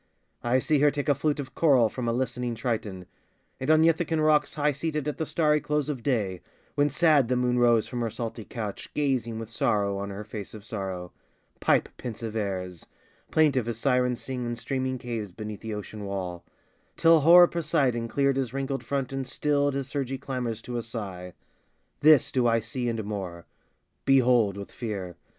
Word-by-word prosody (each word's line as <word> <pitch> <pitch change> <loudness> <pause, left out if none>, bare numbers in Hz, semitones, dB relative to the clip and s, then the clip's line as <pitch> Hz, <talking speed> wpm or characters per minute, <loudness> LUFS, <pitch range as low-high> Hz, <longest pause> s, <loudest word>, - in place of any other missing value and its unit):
I 120 +2 +2
see 145 +3 +2
her 145 +1 +5
take 145 +1 -3
a - - +6
flute 150 +2 -1
of 135 -2 -6
coral 135 -8 +4
from 120 +2 -4
A - - +2
listening 120 -1 -2
Triton; 110 -5 -3 0.5
and 130 - -3
on 155 0 +6
Ithakan 165 0 +2
rocks 155 -1 +3
High 150 0 +2
seated 150 +1 -3
at 150 - -3
the 160 - -1
starry 150 -2 +2
close 150 0 -1
of 135 -5 -3
day, 105 -9 -1 0.3
When 145 0 +2
sad 150 -3 +4
the 125 - +1
moon 125 0 +1
rose 120 -2 +4
from 120 -1 -4
her 115 - 0
salty 115 0 -5
couch, 105 -2 -6
Gazing 130 -6 0
with 115 0 -7
sorrow 100 -2 +1
on 100 0 -4
her 100 +1 -6
face 105 -1 -7
of 105 -1 -11
sorrow, 95 -5 -5 0.5
Pipe - - +3
pensive 115 -2 -6
airs, 95 -5 -4 0.4
plaintive 140 -7 +3
as 115 -2 -3
Sirens 125 -1 +1
sing 130 -2 -4
In 120 0 -3
streaming 130 +2 -2
caves 115 -5 -5
beneath 105 +2 -7
the 110 -1 -4
ocean 105 +1 -7
wall, 90 -3 -4 0.5
Till 165 0 +6
hoar 175 +4 +8
Poseidon 145 -9 0
cleared 140 +2 +1
his 130 -2 -2
wrinkled 135 -1 -2
front 135 +1 -2
And 135 -1 -3
stilled 145 0 +1
his 135 -1 -2
surgy 135 -2 -3
clamors 125 -4 -4
to 120 -1 -3
a - - -2
sigh. 100 -6 -6 0.7
This 155 -2 +6
do 125 -2 +2
I 115 0 +3
see, 120 +2 -3
and 115 -1 -2
more: 95 -5 -5 0.6
Behold, 125 -7 +4
with 100 - -8
fear! 100 -7 -5
125 Hz, 185 wpm, -27 LUFS, 110-140 Hz, 0.7 s, hoar